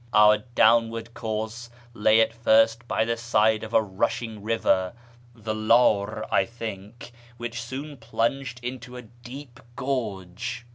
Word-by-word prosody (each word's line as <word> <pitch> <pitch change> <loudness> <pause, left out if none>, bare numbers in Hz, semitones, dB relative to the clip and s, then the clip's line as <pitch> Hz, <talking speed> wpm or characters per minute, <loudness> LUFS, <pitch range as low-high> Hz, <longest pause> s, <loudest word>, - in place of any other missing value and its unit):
Our 105 0 +6 0.2
downward 115 0 +3
course 110 +1 -4 0.2
lay 110 0 +4
at 115 - +1
first 115 +1 +3
by 110 - +1
the 115 +1 0
side 110 -2 +2
of 110 - -7
a 110 - +4
rushing 105 +2 -2
river 100 -4 +1 0.4
(the 110 -1 -4
Lar, 110 -1 +2
I - - +4
think), 115 0 -8 0.3
which 115 -1 -5
soon 135 +5 -7
plunged 120 +2 -2
into 125 0 -6
a 125 - -8
deep 120 +3 -12 0.2
gorge. 115 -3 -4
115 Hz, 135 wpm, -25 LUFS, 110-120 Hz, 0.4 s, Our